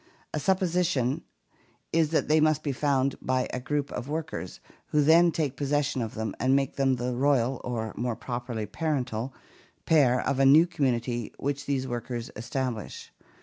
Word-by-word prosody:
The 150 - -1
supposition 170 -6 +1 0.7
is 160 -2 +3
that 160 - +1
they 155 +1 +4
must 155 -1 +2
be 145 - -1
found 135 0 +1
by 130 0 0
a 125 - -1
group 145 +2 -2
of 125 +3 -5
workers, 155 - -4 0.3
who 150 -1 +2
then 165 +3 +6
take 150 -5 -1
possession 145 -2 0
of 110 -2 -4
them 110 0 -3
and 130 +2 +3
make 135 -1 0
them 135 -1 +2
the 125 0 -2
royal, 130 -1 +2
or 110 -3 -3
more 120 -1 -2
properly 120 -3 -4
parental, 130 - -2 0.5
pair 135 -6 +4
of 135 - -1
a - - +5
new 155 +5 +7
community 120 -7 -1
which 140 +1 -3
these 135 -2 -1
workers 120 -1 -4
establish. 120 0 -4
135 Hz, 165 wpm, -27 LUFS, 120-150 Hz, 0.7 s, new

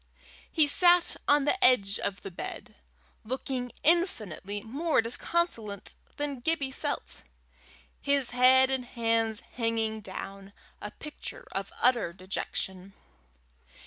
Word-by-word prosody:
He 315 -2 +5
sat 350 +4 +5
on 290 -1 +4
the 380 +6 +1
edge 205 - +4
of 200 0 -4
the 195 - -7
bed, 170 - -7 0.5
looking 255 +1 -3
infinitely 215 - 0
more 295 +8 0
disconsolate 230 - -1 0.2
than 290 -3 -3
Gibbie 280 0 0
felt, - - -4 0.8
his 280 -3 +3
head 260 +1 +6
and 265 -1 0
hands 230 -2 0
hanging 225 -2 -2
down, 195 0 -8 0.3
a 210 - -5
picture 310 - -8
of - - -4
utter 240 -9 +3
dejection. 190 +1 -5
245 Hz, 115 wpm, -29 LUFS, 205-290 Hz, 0.8 s, head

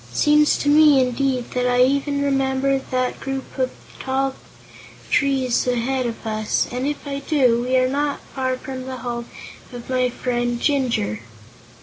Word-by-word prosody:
Seems 300 - +4
to - - -3
me, 295 -1 +6
indeed, 255 0 0
that 250 0 0
I 250 0 +4
even 280 +2 +1
remember 270 0 +1
that 255 -1 -1
group 270 0 -5
of 255 -1 +1
three - - -15
tall 265 0 0 0.8
trees 265 -4 +1
ahead 250 +1 0
of 230 -1 -7
us; 215 -1 0
and, 250 +2 -2
if 295 0 -4
I 280 -1 -3
do, 260 -5 +2
we 255 +1 +1
are 255 0 +3
not 285 +2 -1
far 260 -1 -1
from 260 -1 -7
the 260 -1 -5
home 240 -1 -5 0.4
of 245 -1 -9
my 255 -1 +2
friend 240 -1 -2
Jinjur." 240 - 0
260 Hz, 160 wpm, -21 LUFS, 245-275 Hz, 0.8 s, me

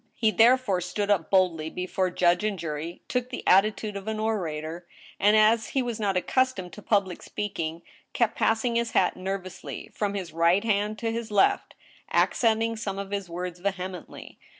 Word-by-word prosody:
He 220 -2 +2
therefore 225 -2 +4
stood 200 +4 -2
up 180 -6 +1
boldly 175 -5 +2
before 185 +2 -1
judge 175 +1 +2
and 210 -2 -1
jury, 165 0 -5
took 250 0 -1
the 255 - -6
attitude 210 +2 +3
of 200 +1 -7
an 220 0 -2
orator, 170 -6 -3 0.3
and, 210 +3 +5
as 220 +1 +4
he 265 - 0
was 240 -3 -4
not 200 -3 0
accustomed 200 -3 0
to 210 - -10
public 200 -4 0
speaking, 170 -5 -4 0.3
kept 235 -3 +1
passing 230 +1 +1
his 235 0 -1
hat 180 - +3
nervously 185 0 -6
from 205 -1 -2
his 185 -4 -5
right 170 +4 +3
hand 210 -1 0
to 225 0 -2
his 230 0 -4
left, 205 -2 +2 0.4
accenting 225 -1 +2
some 200 -3 -4
of 200 0 -5
his 200 -3 -3
words 175 +1 -5
vehemently. 185 -2 -5
200 Hz, 175 wpm, -26 LUFS, 180-220 Hz, 0.4 s, and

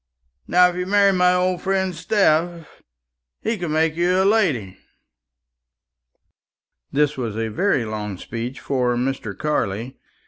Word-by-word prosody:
Now, 180 0 +5
if 180 - -4
you 180 0 -3
marry 200 0 +4
my 180 -1 +3
old 180 0 0
friend 190 -1 0
Steph, 170 -2 0 0.6
he 225 +2 0
can 175 -6 -4
make 160 0 +1
you 180 +2 +2
a 190 - +3
lady." 160 - +1 2.1
This 150 0 +1
was 115 -4 -4
a 115 0 -2
very 135 - 0
long 105 -3 -5
speech 120 +6 -6
for 125 -3 0
Mr. 120 -5 -3
Carley. 120 -5 -2
160 Hz, 135 wpm, -21 LUFS, 120-180 Hz, 2.1 s, Now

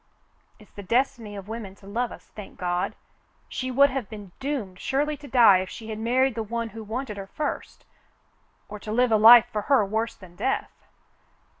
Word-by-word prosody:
It's 215 - -19
the 205 - -9
destiny 230 0 -1
of 195 -1 -8
women 220 -3 -7
to 195 - -19
love 230 +5 -2
us, - - -13
thank 210 -2 -10
God. 175 0 -2 0.5
She 255 - -4
would 280 +2 +4
have 260 -5 -4
been 205 -4 -10
doomed 255 -10 -4
surely 290 +3 -1
to 290 0 -12
die 230 -8 +6
if 185 0 -4
she 225 -1 -9
had 215 - -5
married 255 +3 +2
the 225 - -3
one 230 +1 -3
who 225 0 -9
wanted 220 0 -5
her 195 -1 -7
first 295 +8 -5 0.4
— - - -40
or 210 0 -8
to 210 - -7
live 245 +2 +2
a 220 - +5
life 230 +2 +9
for 210 - -2
her 270 -7 +5
worse 220 +3 -2
than 180 -2 -15
death." 265 - -1
225 Hz, 200 wpm, -25 LUFS, 205-255 Hz, 0.5 s, life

